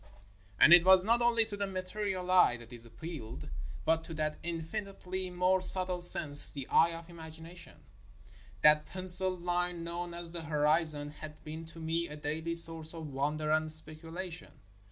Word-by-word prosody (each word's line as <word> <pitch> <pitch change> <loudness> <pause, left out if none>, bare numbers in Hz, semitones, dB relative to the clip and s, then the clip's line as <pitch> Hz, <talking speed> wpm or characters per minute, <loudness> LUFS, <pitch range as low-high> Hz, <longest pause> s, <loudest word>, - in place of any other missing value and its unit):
And 170 - +6
it 175 -1 +7
was 190 0 +4
not 235 +2 0
only 235 -1 +1
to 215 -2 -9
the 200 0 -5
material 185 0 -5
eye 180 -9 +3
that 120 +1 -16
it 120 -1 -14
appealed, 135 +1 -10 0.4
but 160 0 0
to 165 - -10
that 155 0 -4
infinitely 185 +2 -7
more 180 +1 -1
subtle 185 -1 +5
sense, 150 -4 +7
the 140 -2 -7
eye 165 - +3
of 165 - -13
imag 160 -2 -13
ination. 170 +2 -14 0.9
That 150 0 +3
penciled 185 -1 -1
line 175 -1 -3
known 170 +1 -7
as 170 -1 -10
the 170 -1 -7
horizon 150 -1 +3
had 150 0 -13
been 160 +1 -10
to 165 0 -14
me 165 +1 -4
a 150 - -11
daily 160 +3 -5
source 165 -1 -1
of 155 -4 -10
wonder 150 +3 -3
and 155 0 -1
speculation. 165 +3 -7
165 Hz, 170 wpm, -29 LUFS, 155-180 Hz, 0.9 s, it